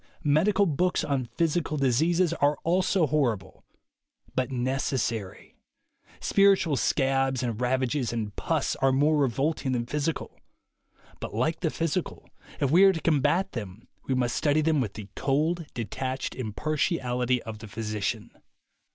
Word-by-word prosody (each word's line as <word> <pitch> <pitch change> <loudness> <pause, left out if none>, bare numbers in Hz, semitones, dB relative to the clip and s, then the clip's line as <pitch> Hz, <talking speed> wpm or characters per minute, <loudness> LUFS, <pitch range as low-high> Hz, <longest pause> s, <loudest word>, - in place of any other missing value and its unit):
Medical 185 +8 +3
books 180 +2 +1
on 135 -4 -1
physical 165 -2 0
dis 135 -2 +2
eases 170 +1 +2
are 145 -2 +2
also 180 +1 +2
horrible 125 -10 -1 0.4
— - - -34
but 130 0 0
necessary. 125 -5 -2 0.6
Spiritual 195 -6 +3
scabs 135 -1 +1
and 120 -1 -3
ravages 130 0 0
and 110 -3 -4
pus - - -1
are 135 0 +3
more 145 +4 +3
revolting 140 0 0
than 120 -1 -1
physical 150 +5 -3 0.4
— - - -30
but - - -6
like 150 +8 0
the 165 - 0
physical, 165 +2 -3 0.3
if 140 -2 +1
we 180 +5 +6
are 195 -1 +7
to 165 - -3
combat 165 +5 +1
them, 110 0 -7 0.2
we 130 - +1
must 125 -1 0
study 150 0 +2
them 155 -2 +2
with 105 -6 -3
the 105 -2 -7
cold 155 +4 0
detached 130 +4 -3
impartiality 125 - -1
of 110 -2 -7
the 110 - -9
physician. 105 0 -3
135 Hz, 145 wpm, -27 LUFS, 125-160 Hz, 0.6 s, are